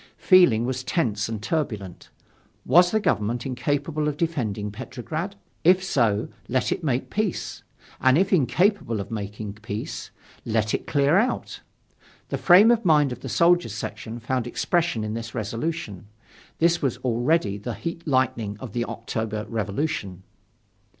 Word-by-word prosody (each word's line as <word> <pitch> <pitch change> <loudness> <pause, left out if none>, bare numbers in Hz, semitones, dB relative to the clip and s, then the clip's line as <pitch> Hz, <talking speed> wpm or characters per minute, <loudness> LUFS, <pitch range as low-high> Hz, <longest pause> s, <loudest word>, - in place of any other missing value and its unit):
Feeling 155 - +5
was 130 0 -2
tense 115 - -1
and 110 -2 -5
turbulent, 110 - -3 0.6
Was 175 +6 +6
the 220 - +1
Government 120 - 0
incapable 145 +4 -1
of 150 -1 -2
defending 110 -12 -2
Petrograd? 145 - -5 0.3
If 185 +2 +5
so, 115 - +1 0.2
let 130 +1 0
it - - -2
make 130 -4 -1
peace. 215 -3 -2 0.4
And 130 +2 +4
if 195 +3 +2
incapable 155 - +2
of 100 - -6
making 105 -1 -5
peace, 110 -1 -5 0.3
let 110 -1 0
it - - -2
clear 145 +5 +3
out. 240 +4 -2 0.7
The - - -2
frame 195 +6 +7
of 235 -1 +2
mind 150 -6 +4
of 125 - -6
the - - -7
Soldiers' 170 - +3
section 115 +1 -6
found 125 +1 -2
expression 170 -3 0
in 105 0 -3
this 115 +1 -6
resolution. 115 - -4 0.5
This 170 +1 +2
was 135 -5 0
already 120 -3 +1
the 115 +2 -5
heat 170 +4 -6
lightning 115 -6 0
of 125 -6 -8
the 120 -1 -1
October 110 -2 -4
Revolution. 100 - -3
125 Hz, 145 wpm, -24 LUFS, 110-165 Hz, 0.7 s, frame